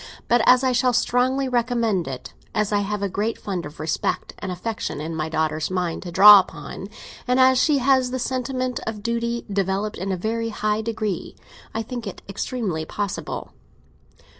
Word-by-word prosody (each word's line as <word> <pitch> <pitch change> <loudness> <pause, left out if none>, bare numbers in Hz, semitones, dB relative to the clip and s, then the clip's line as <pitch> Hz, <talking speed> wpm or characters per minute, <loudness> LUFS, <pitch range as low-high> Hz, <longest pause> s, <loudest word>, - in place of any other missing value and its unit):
But 240 0 +4
as 255 +1 +6
I 260 - +3
shall 250 0 +2
strongly 255 +3 +2
recommend 235 - 0
it, 130 -2 -7 0.2
as 210 -1 +1
I 205 - +3
have 205 0 -2
a - - +2
great 205 +4 -2
fund 180 -6 -4
of 150 - -14
respect 155 +1 -2
and 190 - -4
affection 180 -4 -4
in 160 +2 -4
my 155 0 -2
daughter's 155 -1 -1
mind 180 -3 -2
to 180 - -7
draw 205 +3 +10
upon, 190 +1 -6 0.4
and 250 +1 +2
as 260 0 +6
she 300 -2 +3
has 260 -1 +3
the 260 - -2
sentiment 255 0 -2
of 215 -2 -4
duty 235 +1 -1
developed 195 +2 -1
in 195 +2 -2
a 185 - -1
very 230 +4 -2
high 215 0 -1
degree, 215 -4 -3 0.4
I 225 - -1
think 240 -1 -6
it 195 - -8
extremely 200 -4 -3
possible." 200 +4 -4
215 Hz, 180 wpm, -23 LUFS, 190-245 Hz, 0.4 s, draw